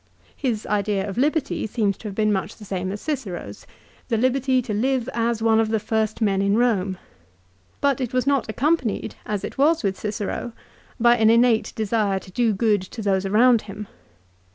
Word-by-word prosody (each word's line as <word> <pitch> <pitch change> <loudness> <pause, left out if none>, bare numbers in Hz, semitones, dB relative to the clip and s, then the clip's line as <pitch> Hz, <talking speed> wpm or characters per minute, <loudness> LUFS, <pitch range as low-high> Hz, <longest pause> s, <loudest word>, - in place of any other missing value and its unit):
His 235 -6 -2
idea 205 -1 0
of 200 +4 -4
liberty 300 -3 0
seems 210 -3 0
to 220 - -8
have 200 - -6
been 215 0 +2
much 190 - -3
the 210 - -12
same 190 -1 -3
as 205 - -5
Cicero's, 190 - -5 0.4
the 230 - 0
liberty 260 +2 +2
to 220 - -4
live 250 +3 0
as 230 -1 0
one 225 -1 +4
of 225 -1 +1
the 220 0 +1
first 220 +1 -1
men 195 -2 +2
in 200 +1 +2
Eome; 200 -6 +1 0.8
but 275 -2 +2
it 250 -2 -2
was 255 -1 0
not 275 -5 +1
accompanied, 260 -1 0
as 210 -2 -2
it - - -6
was 315 +4 +3
with 195 -2 -1
Cicero, 210 +2 -4 0.5
by 240 +1 +5
an 220 -1 +4
innate 230 -1 +3
desire 215 -2 0
to 190 - -9
do 230 +3 +2
good 210 -1 +2
to 215 +4 -8
those 195 -1 +1
around 230 +3 +4
him. 205 +1 -6
220 Hz, 190 wpm, -23 LUFS, 200-245 Hz, 0.8 s, by